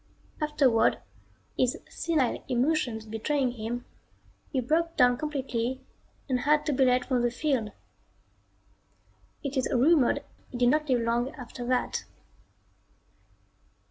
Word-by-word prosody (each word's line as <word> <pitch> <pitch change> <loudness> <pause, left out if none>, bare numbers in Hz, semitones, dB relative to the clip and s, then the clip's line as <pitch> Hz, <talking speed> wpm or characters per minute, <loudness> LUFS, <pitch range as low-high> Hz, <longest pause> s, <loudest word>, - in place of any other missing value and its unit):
Afterward, 285 -6 +3 0.6
his 255 -1 +1
senile 305 -8 -1
emotions 250 -3 0
betraying 250 +5 -1
him, 240 +1 -5 0.7
he 265 - 0
broke 330 +7 0
down 245 -1 +5
completely 260 -3 -2 0.5
and 255 -3 +1
had 300 +3 +2
to 300 - 0
be 265 - +3
led 250 0 +3
from 250 -2 +1
the 240 - +2
field. 245 -3 -1 1.7
It 280 -1 -3
is 260 - +1
rumored 270 +1 +3 0.3
he 245 - -6
did 245 0 +4
not 300 +2 +1
live 250 -2 +3
long 235 +2 0
after 250 -1 -8
that. 255 0 0
255 Hz, 120 wpm, -28 LUFS, 240-295 Hz, 1.7 s, down